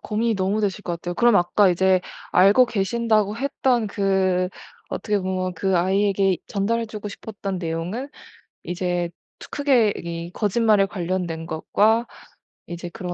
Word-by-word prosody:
고민이 225 +1 -1
너무 195 +3 0
되실 205 0 -1
것 175 - -2
같아요. 175 +1 -5
그럼 240 0 +4
아까 185 +3 +4
이제 185 +1 +3 0.3
알고 200 +7 +6
계신다고 215 0 0
했던 260 -3 0
그 190 -2 +1 0.4
어떻게 210 +1 -1
보면 185 -1 -2
그 190 +1 0
아이에게 195 +1 +2
전달해주고 215 0 -2
싶었던 200 -3 -6
내용은 175 - -4 0.6
이제 175 -1 -2 0.3
트 - - -11
크게 255 -8 +2
이게 170 0 -5
거짓말에 210 -1 +3
관련된 175 -3 -3
것과 215 +8 +2 0.6
이제 175 0 -6
그런 180 0 -6
195 Hz, 305 characters per minute, -23 LUFS, 180-215 Hz, 0.6 s, 알고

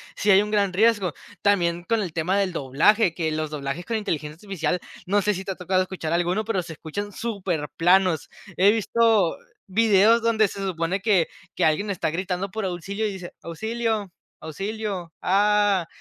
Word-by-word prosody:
sí 205 - +2
hay 195 +1 +7
un 210 - -3
gran 200 -3 +1
riesgo. 205 -4 +3 0.3
También 175 -4 +2
con 225 +4 0
el 185 -5 -3
tema 180 +5 0
del 190 -3 0
doblaje, 165 - +3
que 160 -2 -2
los 155 0 -2
doblajes 145 +3 -4
con 230 +2 -1
inteligencia 155 -8 -3
artificial, 180 -2 -2 0.3
no 205 +3 +2
sé 210 +2 +1
si 190 - -5
te 195 - -4
ha - - -4
tocado 185 +1 +1
escuchar 185 -4 -5
alguno, 175 +5 +1
pero 205 -4 0
se 165 - -8
escuchan 205 +7 -6
superplanos. 185 -4 0 0.3
He 195 +3 +6
visto 225 -4 +2 0.3
videos 220 +2 +4
donde 220 -2 +3
se 200 - -8
supone 185 0 -2
que 200 -6 +3 0.3
que - - +2
alguien 160 +7 +1
está 185 -5 -1
gritando 185 +3 -2
por 220 +1 -4
auxilio 190 +4 -3
y - - -3
dice: 180 -2 -8
"Auxilio, 220 +3 -2 0.3
auxilio, 195 0 -5
ah", 205 -2 +3
190 Hz, 175 wpm, -24 LUFS, 170-210 Hz, 0.3 s, hay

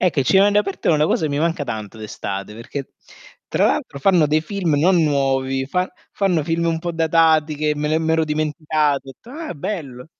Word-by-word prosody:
Ecco, 175 -6 +2
i - - 0
cinema 190 +9 +5
all' 205 - +1
aperto 195 -2 -2
è - - +5
una 150 0 +3
cosa 160 - 0
che 155 - -1
mi 145 - -1
manca 165 -1 0
tanto 110 -4 -6
d'estate, 100 -2 -6
perché 125 +4 -7 0.6
tra - - +1
l'altro 140 - -1
fanno 170 +1 +4
dei 155 +1 +1
film 170 -3 -1
non 175 +2 +4
nuovi, 135 -2 0
fan 180 +6 -1 0.2
fanno 180 -6 +1
film 165 +2 0
un 165 -1 0
po' 170 +1 -4
datati, 160 -1 +3
che 150 +1 0
me 150 0 -2
l'e 155 +1 +2
m'ero 160 0 +1
dimenticato. 150 -2 -1
Ho - - -8
detto: 230 - -17
"Ah, 315 +4 -6
bello!" 140 -7 -5
155 Hz, 210 wpm, -20 LUFS, 140-170 Hz, 0.6 s, cinema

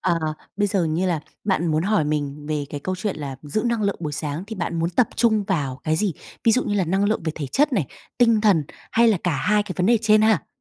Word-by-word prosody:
ờ, 170 -1 +1 0.4
bây 205 - +2
giờ 190 -3 +1
như 165 +4 0
là 170 -4 0 0.2
bạn 190 -4 +1
muốn 155 -1 +1
hỏi 205 -3 +2
mình 145 -1 -3
về 150 -2 -1
cái 145 - -5
câu 185 - -2
chuyện 195 +1 -3
là 140 -3 -5
giữ 155 +9 -2
năng 235 -2 0
lượng 200 -1 0
buổi 150 -3 -3
sáng 150 +3 -4
thì 220 - -6
bạn 170 -1 -2
muốn 165 +2 0
tập 235 +7 +2
trung 220 -3 +3
vào 140 - -2
cái 155 0 +1
gì, 200 -2 0 0.3
ví 225 - +5
dụ 255 - +3
như 205 - -1
là 190 -3 +2
năng 190 +4 +1
lượng 210 -2 0
về 160 - -1
thể 145 -3 -4
chất 290 - +1
này, 175 - +1 0.3
tinh 230 -3 +4
thần 195 -8 +3 0.3
hay 230 0 +5
là 215 - +3
cả 165 -5 +1
hai 210 +9 +2
cái 205 - -6
vấn 180 0 +1
đề 235 0 +4
trên 215 -1 +5
ha? 215 -7 +3
185 Hz, 270 wpm, -23 LUFS, 155-215 Hz, 0.4 s, ví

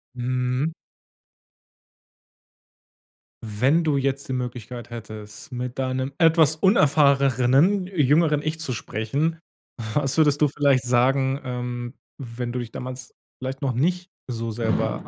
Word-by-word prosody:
Mhm. 125 +4 -1 2.7
Wenn 125 +10 +2
du 150 -3 +1
jetzt 135 0 -1
die - - -1
Möglichkeit 120 -1 -5
hättest, 110 +2 -9
mit 125 +1 -5
deinem 130 +1 -1
etwas 160 -2 +5
unerfahreneren 140 - +3
jüngeren 150 -3 +2
Ich 155 +1 -3
zu 160 -5 -3
sprechen, 140 +7 -2 0.6
was 140 -2 +1
würdest 150 -2 +4
du - - +6
vielleicht 140 -2 +2
sagen, 130 +2 +2
ähm, 125 -1 -4 0.3
wenn 120 -2 -5
du 125 - -2
dich 120 -2 -6
damals 130 0 -8 0.2
vielleicht 130 +1 -5
noch 135 -2 0
nicht 180 +8 -1 0.2
so 115 -1 -3
selber 110 0 -1
130 Hz, 120 wpm, -24 LUFS, 125-150 Hz, 2.7 s, du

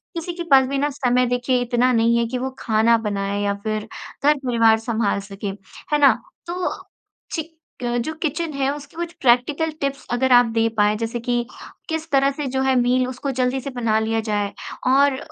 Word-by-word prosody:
किसी 340 +1 -4
के 345 0 -5
पास 265 -1 +7
भी 275 - -2
ना 290 +2 +1
समय, 250 -3 +1
देखिए, 245 +1 0
इतना 245 +1 +2
नहीं 230 +1 +3
है 235 - +2
कि 250 +2 -3
वो 260 +1 -2
खाना 225 0 +3
बनाए 200 0 -2
या 200 0 +1
फिर 215 0 -2 0.4
घर-परिवार 245 -6 +3
संभाल 225 -3 -1
सके। 200 0 -6 0.4
है 295 - +4
ना? 280 -4 +7 0.3
तो, 360 +1 -2 0.6
चि 320 - -1 0.4
क 240 0 0
जो 315 - -3
किचन 315 0 -2
है, 275 -1 0
उसकी 290 +1 -12
कुछ 340 0 -4
प्रैक्टिकल 280 +6 +2
टिप्स 275 0 -2
अगर 260 +1 +1
आप 245 0 +7
दे 225 0 +3
पाएँ, 210 0 +3
जैसे 230 +1 -3
कि 240 0 -1 0.4
किस 320 0 -3
तरह 275 0 +4
से 290 +1 -5
जो 265 - +2
है, 265 0 +2
मील 250 +1 +2
उसको 260 +2 -4
जल्दी 255 +1 +1
से 275 - -5
बना 230 -3 +1
लिया 225 0 0
जाए 205 -1 -1 0.4
और 275 +1 +4
250 Hz, 195 wpm, -22 LUFS, 230-275 Hz, 0.6 s, पास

